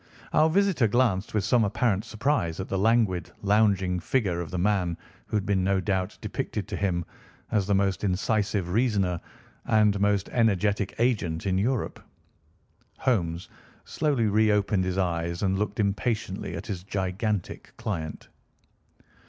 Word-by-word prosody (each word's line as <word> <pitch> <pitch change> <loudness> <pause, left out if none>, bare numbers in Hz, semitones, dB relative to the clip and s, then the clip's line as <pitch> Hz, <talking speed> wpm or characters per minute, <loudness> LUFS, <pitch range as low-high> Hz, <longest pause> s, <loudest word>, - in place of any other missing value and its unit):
Our 155 +1 +5
visitor 185 - +3
glanced 110 -4 +1
with 105 - +2
some 120 +3 +3
apparent 105 0 +1
surprise 110 - -1
at 95 - -3
the 95 - -1
languid, 105 -5 +2
lounging 100 -3 +2
figure 90 -4 0
of 85 - -6
the 90 - -4
man 90 -3 +1 0.3
who 110 - 0
had 100 - -2
been 95 -2 +1
no 95 0 +2
doubt 95 0 -1
depicted - - -4
to - - -3
him 90 -4 -1 0.5
as 100 -3 +1
the 100 - +3
most 95 0 +1
incisive 100 -1 0
reasoner 100 -5 +1 0.4
and 105 -2 +3
most 100 -1 +2
energetic 105 -3 +1
agent 105 -10 0
in 95 -1 +1
Europe. 120 +2 -1 1.0
Holmes 90 -9 0 0.4
slowly 145 -7 0
reopened 105 -2 +2
his 95 0 -2
eyes 85 -1 -1
and 95 0 +1
looked 105 +1 -2
impatiently 105 -1 -1
at - - -6
his 95 -5 -4
gigantic 95 +1 -3
client. 80 -7 -4
100 Hz, 145 wpm, -27 LUFS, 95-110 Hz, 1.0 s, Our